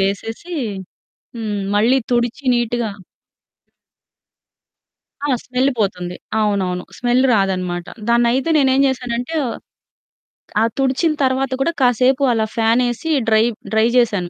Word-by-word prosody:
వేసేసి 225 - -3 0.8
హ్మ్, 210 -3 -3 0.2
మళ్ళీ 235 +5 +4
తుడిచి 240 +3 0
నీట్‌గా 240 -2 -1 2.3
ఆ! - - 0 0.2
స్మెల్ 255 +2 +1
పోతుంది. 180 -3 -2 0.2
అవునవును. 190 -4 0
స్మెల్ 245 +2 +2
రాదనమాట. 185 -4 0 0.2
దాన్నైతే 240 +5 +2
నేనేం 265 -2 +3
జేశానంటే, 250 +3 -3 1.3
ఆహ్, 225 +1 +2
తుడిచిన 270 +4 +1
తర్వాత 260 0 +1
కూడా 335 - +2
కాసేపు 255 +2 +3
అలా 220 -1 +1
ఫ్యానేసి 240 +6 +1 0.2
డ్రై, 220 0 +4 0.3
డ్రై 220 +1 +4
జేశాను. 205 -7 +1
235 Hz, 100 wpm, -19 LUFS, 210-260 Hz, 2.3 s, మళ్ళీ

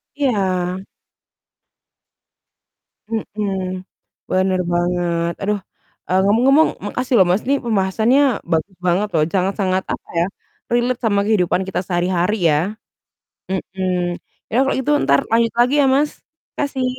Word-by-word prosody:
Iya. 190 -9 0 2.3
Mhm, 215 -2 -3 0.8
bener 185 0 +2
banget, 175 -1 0
aduh, 205 +1 0 0.5
eee, 185 +1 +2
ngomong-ngomong 260 +9 +4 0.2
makasih 250 +4 -3
loh, 190 -4 +6
Mas, 190 - +1
ini 280 - +3
pembahasannya 220 +4 +2 0.3
bagus 175 +4 0
banget 190 +4 +2
loh, 155 - +4
sangat-sangat 190 0 0
apa - - -5
ya, 170 - +3 0.5
relate 240 +1 +1
sama 210 -4 +1
kehidupan 190 -4 +1
kita 190 - -2
sehari-hari 180 +2 +1 0.2
ya. 150 - +3 0.9
Mhm. 180 -2 -2 0.3
Ya, 230 - -1
kalau - - +1
gitu 280 +3 0
entar 140 0 +4
lanjut 230 0 +2
lagi 250 +4 +4
ya, - - +4
Mas. 295 +1 +2 0.5
Makasih, 275 -3 -1
195 Hz, 120 wpm, -19 LUFS, 180-235 Hz, 2.3 s, loh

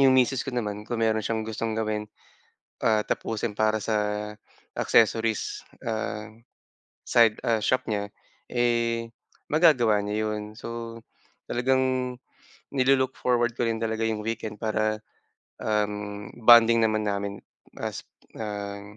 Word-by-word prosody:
'yong 135 -1 +6
misis 130 +1 +3
ko - - -5
naman 105 -2 -3
kung 115 -1 -1
meron 110 0 +2
siyang 110 0 -2
gustong 110 0 -3
gawin, 105 -1 -2 0.7
ah, 110 -2 +2
tapusin 110 -1 -2
para 110 0 +2
sa 110 +2 -2 0.8
accessories, 115 0 +2 0.2
ah, 110 -1 -2 0.8
side 115 -2 +4
ah, 115 -1 +2
shop 130 +3 +1
niya, 100 -1 -2 0.4
eh, 115 -1 +1 0.4
magagawa 135 -9 +5
niya 110 +1 -1
'yon. 105 0 -2
So, 115 0 -7 0.5
talagang 130 0 +1 0.6
ni-lo-look 130 0 +3
forward 120 -1 +1
ko 120 - 0
rin 115 -1 -1
talaga 110 0 -1
'yong 110 -1 -1
weekend 110 -1 -4
para, 110 -1 0 0.6
um, 105 -1 -2 0.2
bonding 115 0 +8
naman 110 -1 +1
namin 100 0 -1 0.4
as, - - -4 0.3
ah, 100 -2 -5
110 Hz, 125 wpm, -26 LUFS, 105-120 Hz, 0.8 s, bonding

